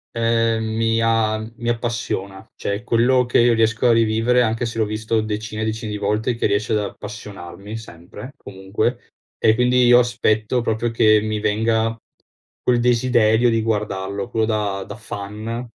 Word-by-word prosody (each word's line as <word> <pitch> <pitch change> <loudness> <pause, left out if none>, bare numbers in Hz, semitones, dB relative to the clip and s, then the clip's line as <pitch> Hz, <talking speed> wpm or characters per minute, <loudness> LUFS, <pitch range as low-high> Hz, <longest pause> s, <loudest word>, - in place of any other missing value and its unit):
Ehm, 115 -1 +1
mi 115 0 +1
a 115 -1 +2 0.2
mi 120 0 -3
appassiona. 115 -5 -3
Cioè, 100 +3 -3
quello 125 +2 +3
che 120 - +2
io 120 0 +5
riesco 115 +2 +2
a 120 - +5
rivivere 115 +2 +2
anche 115 0 0
se 115 -1 -5
l'ho 110 - +2
visto 110 +1 -1
decine 110 0 -4
e - - -1
decine 110 0 -3
di 105 - -3
volte, 105 +4 -1
che 115 - 0
riesce 100 +2 0
ad 105 - +2
appassionarmi 105 0 -8
sempre, 105 +5 -11
comunque, 100 +3 -4 0.3
e 110 0 +3
quindi 125 +1 +3
io 120 0 +7
aspetto 120 -1 +1
proprio 115 0 -1
che 110 -2 +4
mi 110 0 -2
venga 110 +2 0 0.7
quel 120 -1 +2
desiderio 120 -1 +3
di 115 -1 +1
guardarlo, 100 -3 -2
quello 110 -1 0
da 105 -3 -1
da - - -9
fan 110 +2 -6
110 Hz, 165 wpm, -21 LUFS, 105-115 Hz, 0.7 s, io